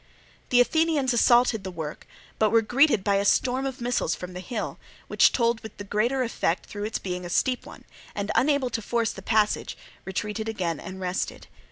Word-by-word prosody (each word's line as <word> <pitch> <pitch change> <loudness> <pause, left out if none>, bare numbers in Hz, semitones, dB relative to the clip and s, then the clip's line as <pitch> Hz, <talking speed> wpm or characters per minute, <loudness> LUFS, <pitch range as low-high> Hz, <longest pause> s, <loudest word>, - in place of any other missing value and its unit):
The 245 - +4
Athenians 305 -2 +2
assaulted 240 -2 +4
the 190 - -4
work, 160 -4 -7 0.3
but 215 - +4
were 225 +1 +4
greeted 245 -2 +3
by 200 -1 +2
a 200 - +1
storm 255 +5 +2
of 265 -1 -6
missiles 240 -8 0
from 180 0 -8
the 180 - -6
hill, 220 +4 -5 0.3
which - - +4
told 235 -2 +1
with 220 - -10
the 205 - -6
greater 235 +6 0
effect 190 -7 -1
through 205 0 -5
its 220 - -2
being 180 -1 -5
a 175 - -6
steep 250 +8 0
one, - - -12 0.3
and 200 0 -2
unable 280 -3 +2
to 225 - -2
force 230 +1 0
the 195 - -9
passage, 215 +1 +1 0.3
retreated 210 +3 -3
again 175 -7 -2
and 190 0 -8
rested. 185 0 -3
220 Hz, 195 wpm, -26 LUFS, 190-245 Hz, 0.3 s, The